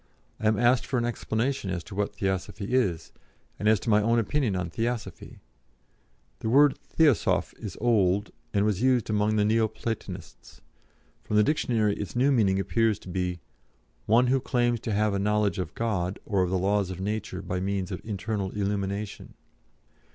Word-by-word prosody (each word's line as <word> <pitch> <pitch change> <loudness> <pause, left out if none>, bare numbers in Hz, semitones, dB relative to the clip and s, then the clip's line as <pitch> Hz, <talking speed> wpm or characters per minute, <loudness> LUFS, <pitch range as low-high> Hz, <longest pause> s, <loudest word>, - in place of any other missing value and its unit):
I 110 - 0
am 110 -1 +3
asked 120 +2 +3
for 130 - -1
an 120 - +1
explanation 120 -1 -2
as 90 -2 -3
to - - -11
what 100 +1 -2
Theosophy 100 +3 -3
is, 90 -11 0 0.5
and 105 - -1
as 110 -2 +4
to - - -3
my 105 0 +5
own 115 +2 +2
opinion 115 -1 0
on 90 -2 -2
Theosophy 115 +3 -4 1.0
the 110 - -2
word 140 +3 +5
'theosoph' 150 -8 +2
is - - -7
old, 105 -4 +2 0.2
and 100 0 +2
was 105 -2 0
used 125 -4 +2
among 105 0 +1
the 105 -1 +3
Neo 110 +1 +3
platonists. 105 -4 -7 0.6
From 105 - -3
the 105 - +6
dictionary 110 -7 +1
its 105 - -6
new 130 +4 +3
meaning 100 -7 +3
appears 110 +1 +1
to - - -12
be, 90 -1 -2 0.7
'one 115 +4 +5
who 130 +2 +2
claims 120 -2 0
to 110 - -4
have 105 0 +1
a 100 - 0
knowledge 105 0 +1
of 90 - -4
God, 100 -5 -1
or 100 -4 +1
of 90 - +1
the 95 - +1
laws 100 +1 +1
of 95 -1 -6
nature 100 -1 -3
by 90 0 -3
means 95 0 -2
of 90 - -5
internal 100 -1 -3
illumination.' 100 0 -3
105 Hz, 180 wpm, -27 LUFS, 95-115 Hz, 1.0 s, the